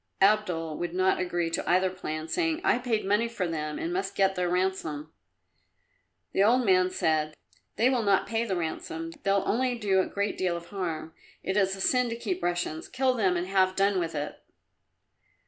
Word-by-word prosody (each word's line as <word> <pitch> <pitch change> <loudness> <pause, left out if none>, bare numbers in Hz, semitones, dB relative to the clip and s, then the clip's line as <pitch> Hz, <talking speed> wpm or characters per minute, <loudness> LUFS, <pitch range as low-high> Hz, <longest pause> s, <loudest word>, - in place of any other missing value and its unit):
Abdul 180 -7 +2
would 175 0 -3
not 185 +1 +2
agree 175 -2 -1
to - - -2
either 185 +1 +3
plan, 155 -4 -5
saying, 330 - 0
"I 240 - +3
paid 235 -5 -1
money 210 +4 +2
for 210 -6 -3
them 155 -2 -3
and 335 +1 -3
must 380 +2 -2
get 195 -1 +3
their 180 -1 -1
ransom." 175 -5 -2 1.2
The 195 - +3
old 240 +4 +4
man 185 -2 +4
said, 155 -4 0 0.4
"They 235 - +3
will 255 -2 +2
not 200 -3 +3
pay 225 0 -1
the 200 -5 -2
ransom; 165 -1 -4
they'll 195 0 +2
only 250 +2 +1
do 200 -4 +2
a 185 - +1
great 200 +1 -2
deal 180 -2 0
of 170 0 -10
harm. 165 -5 -4 0.3
It 190 - -2
is 195 -2 +2
a 195 - -8
sin 250 +3 +2
to 230 - -3
keep 360 +10 -3
Russians. 175 -3 -2
Kill 260 0 +1
them 190 -7 +1
and 175 - -1
have 185 0 +2
done 195 -1 +2
with 165 -2 -3
it." 145 0 -4
190 Hz, 195 wpm, -28 LUFS, 170-215 Hz, 1.2 s, old